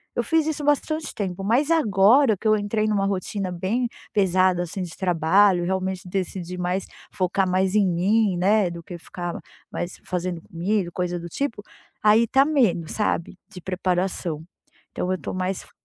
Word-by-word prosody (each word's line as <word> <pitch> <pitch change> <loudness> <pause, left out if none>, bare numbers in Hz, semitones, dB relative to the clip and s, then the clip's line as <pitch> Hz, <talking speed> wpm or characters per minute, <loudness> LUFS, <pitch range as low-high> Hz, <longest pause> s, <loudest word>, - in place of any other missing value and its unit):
Eu - - 0
fiz 320 -2 +2
isso 305 -1 -2
bastante 310 +2 0
tempo, 195 -2 -3
mas 260 +10 +2
agora 225 - +4
que 220 - -3
eu 215 - +5
entrei 215 +1 -1
numa 200 -2 +1
rotina 195 0 -2
bem 200 +8 -1 0.3
pesada, 185 -2 +3
assim, 175 +2 -5
de 170 -3 -6
trabalho, 180 +1 +3
realmente 190 0 -2
decidi 180 -1 -4
mais 180 +2 -1 0.3
focar 185 0 0
mais 185 +1 +1
em 205 -3 +4
mim, 190 +2 +2
né, 195 +1 +3
do 170 -1 -8
que 175 0 -8
ficar 175 0 -6 0.3
mais 175 +1 -5
fazendo 180 -1 -3
comida 180 +3 -1
e - - -19
coisa 175 0 -2
do 170 - -7
tipo, 230 - -3 0.4
aí 215 +2 +5
tá 270 +4 +4
menos, 225 - +1
sabe, 190 -4 -1
de 180 - -11
preparação. 180 -3 -1 0.5
Então, 180 - -2
eu 185 - 0
tô - - -5
mais 185 0 -2
f - - -18
190 Hz, 175 wpm, -24 LUFS, 180-215 Hz, 0.5 s, eu